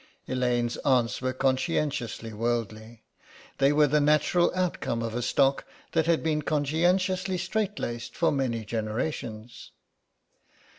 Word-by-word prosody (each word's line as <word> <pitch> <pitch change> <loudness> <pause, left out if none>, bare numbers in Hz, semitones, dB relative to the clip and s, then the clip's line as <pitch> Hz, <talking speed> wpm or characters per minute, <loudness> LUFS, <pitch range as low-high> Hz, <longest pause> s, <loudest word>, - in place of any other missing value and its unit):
Elaine's 125 -2 0
aunts 125 -5 +1
were 130 0 0
conscientiously 130 -3 -1
worldly; 115 0 -3 0.6
they 140 +1 +5
were 150 +1 +5
the 150 +1 +2
natural 150 +4 +3
outcome 170 -10 -1
of 115 -1 -3
a 120 - -2
stock 135 +3 +2 0.3
that 160 -1 +1
had 170 -1 +2
been 155 -1 +1
conscientiously 180 +6 +1
straight 205 +3 -2
laced 120 0 -5
for 165 - +3
many 120 -5 -1
generations. 110 +1 -4
135 Hz, 120 wpm, -27 LUFS, 115-160 Hz, 0.6 s, they